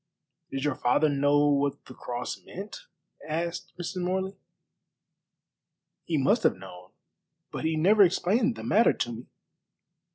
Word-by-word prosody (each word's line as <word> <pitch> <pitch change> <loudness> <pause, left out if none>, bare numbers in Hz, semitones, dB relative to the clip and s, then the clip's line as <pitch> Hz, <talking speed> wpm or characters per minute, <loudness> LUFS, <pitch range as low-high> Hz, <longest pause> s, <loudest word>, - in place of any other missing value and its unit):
"Did 135 0 -4
your 145 - +1
father 130 +5 +2
know 145 +1 +3
what 140 0 0
the 130 - -11
cross 120 0 -5
meant?" 200 +3 -9 0.4
asked 170 +2 -3
Mrs. 180 +2 -4
Morley. 190 +2 -2 1.7
"He 165 - 0
must 200 - +3
have - - +3
known, 90 -1 -12 0.6
but - - -5
he 160 0 +1
never 200 +7 +4
explained 210 +6 +3
the - - -8
matter 225 +3 +4
to 120 - -3
me." 120 +1 -8
155 Hz, 135 wpm, -27 LUFS, 135-190 Hz, 1.7 s, never